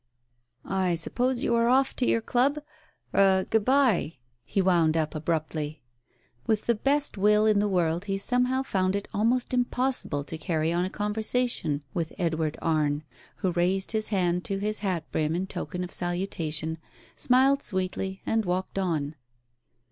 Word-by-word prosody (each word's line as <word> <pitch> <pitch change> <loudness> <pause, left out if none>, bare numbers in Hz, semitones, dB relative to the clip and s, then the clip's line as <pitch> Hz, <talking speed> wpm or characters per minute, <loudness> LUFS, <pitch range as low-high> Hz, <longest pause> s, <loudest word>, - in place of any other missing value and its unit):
"I 185 -2 0
suppose 245 +9 -1
you - - +1
are 235 0 +3
off 265 +2 +3
to 250 - +1
your 230 - +2
club? 265 +6 +2 0.3
— - - -38
er 190 -1 +4
— - - -29
good 220 -1 +3
bye! 250 - +2
" 120 - -44
he - - -2
wound 170 -4 +3
up 155 -1 -1
abruptly. 155 -2 -3 0.6
With 215 -1 +1
the 235 - +3
best 275 +1 0
will 210 +2 +4
in 215 -2 +4
the 205 0 +1
world 175 -1 0
he 195 -1 -1
somehow 250 +5 +1
found 190 -5 0
it 200 - -3
almost 235 +5 +1
impossible 250 - 0
to 160 +3 -7
carry 160 +1 0
on 175 +1 +1
a - - -3
conversation 210 - -1
with 165 -2 -3
Edward 160 -4 -1
Arne, 155 -2 +1 0.3
who 190 -3 -1
raised 180 +3 +1
his 220 -1 0
hand 180 -3 0
to 195 - -2
his 210 +2 -2
hat 185 -6 -1
brim 155 +1 0
in 185 +2 -1
token 180 -1 -5
of 180 - -7
salutation, 165 -3 0 0.4
smiled 270 +2 +3
sweetly, 190 0 -3
and 225 0 +1
walked 185 +1 -2
on. 155 -6 -1
190 Hz, 170 wpm, -27 LUFS, 165-225 Hz, 0.6 s, er